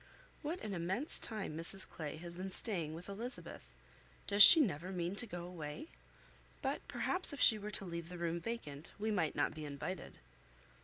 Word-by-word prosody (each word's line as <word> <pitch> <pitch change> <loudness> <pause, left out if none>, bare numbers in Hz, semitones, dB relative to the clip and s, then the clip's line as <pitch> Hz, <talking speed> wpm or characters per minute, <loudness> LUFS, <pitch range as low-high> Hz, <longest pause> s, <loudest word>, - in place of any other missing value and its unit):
What 330 +4 -6
an 210 - -7
immense 190 - -1
time 210 -8 -5
Mrs 170 +4 -1
Clay 150 -4 -8
has 170 +1 -7
been 185 +2 -7
staying 175 -6 -2
with 170 +2 -12
Elizabeth! 225 +6 -7 0.6
Does 205 0 +1
she 325 - +14
never 185 - -2
mean 175 0 -5
to 240 - -2
go 175 -4 -8
away? 165 - -10 0.7
But - - -4
perhaps 365 -4 -2
if 285 - -9
she 220 -3 +3
were 210 +1 -8
to 210 - -2
leave 170 -1 -8
the 180 - -10
room 170 0 -4
vacant, 165 -9 -9
we 215 +2 -4
might 175 -7 -2
not - - -2
be 155 0 -10
invited. 150 +5 -8
180 Hz, 185 wpm, -33 LUFS, 165-215 Hz, 0.7 s, she